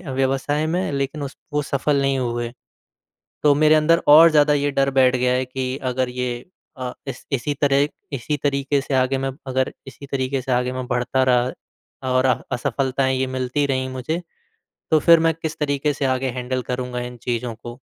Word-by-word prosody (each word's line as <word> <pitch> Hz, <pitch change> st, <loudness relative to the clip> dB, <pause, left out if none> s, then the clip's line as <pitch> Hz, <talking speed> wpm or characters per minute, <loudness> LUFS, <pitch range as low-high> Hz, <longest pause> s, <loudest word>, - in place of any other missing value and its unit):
व्यवसाय 135 Hz, +3 st, 0 dB
में 180 Hz, -1 st, -1 dB
लेकिन 140 Hz, +1 st, -2 dB
उस 140 Hz, -, -6 dB, 0.2 s
वो 150 Hz, -, +1 dB
सफल 140 Hz, +1 st, 0 dB
नहीं 135 Hz, 0 st, +1 dB
हुए। 120 Hz, -1 st, -2 dB, 0.9 s
तो 145 Hz, -1 st, +5 dB
मेरे 155 Hz, +2 st, +5 dB
अंदर 160 Hz, +2 st, +3 dB
और 160 Hz, +3 st, +9 dB
ज़्यादा 150 Hz, -1 st, +4 dB
ये 145 Hz, 0 st, +1 dB
डर 135 Hz, 0 st, +2 dB
बैठ 130 Hz, -1 st, +4 dB
गया 125 Hz, 0 st, +1 dB
है 130 Hz, +1 st, +1 dB
कि 130 Hz, 0 st, -4 dB
अगर 130 Hz, 0 st, -1 dB
ये 125 Hz, 0 st, -2 dB, 0.5 s
अ, 125 Hz, -1 st, -4 dB
इस 135 Hz, -2 st, -7 dB
इसी 140 Hz, +2 st, -1 dB
तरह 140 Hz, 0 st, +3 dB, 0.2 s
इसी 140 Hz, +3 st, -2 dB
तरीक़े 140 Hz, 0 st, +1 dB
से 135 Hz, -, -4 dB
आगे 130 Hz, +1 st, +2 dB
मैं 135 Hz, 0 st, -2 dB, 0.2 s
अगर 130 Hz, 0 st, 0 dB, 0.2 s
इसी 135 Hz, +2 st, -11 dB
तरीक़े 130 Hz, 0 st, -1 dB
से 130 Hz, -, -3 dB
आगे 125 Hz, 0 st, +1 dB
मैं 130 Hz, -1 st, -4 dB
बढ़ता 125 Hz, +2 st, 0 dB
रहा 125 Hz, +1 st, -3 dB
और 130 Hz, +1 st, +3 dB
अह 130 Hz, -, +1 dB
असफलताएँ 130 Hz, 0 st, 0 dB
ये 130 Hz, -, 0 dB
मिलती 130 Hz, +3 st, 0 dB
रही 130 Hz, -1 st, -1 dB
मुझे 160 Hz, +7 st, -2 dB, 0.7 s
तो 155 Hz, -, +5 dB
फिर 170 Hz, +2 st, +6 dB
मैं 165 Hz, 0 st, +2 dB
किस 160 Hz, -1 st, -4 dB
तरीके 145 Hz, 0 st, 0 dB
से 140 Hz, -1 st, -2 dB
आगे 130 Hz, 0 st, -2 dB
हैंडल 125 Hz, +1 st, -2 dB
करूँगा 125 Hz, 0 st, -3 dB
इन 125 Hz, 0 st, -7 dB
चीज़ों 120 Hz, -1 st, -2 dB
को। 120 Hz, +2 st, -9 dB
135 Hz, 190 wpm, -22 LUFS, 125-145 Hz, 0.9 s, और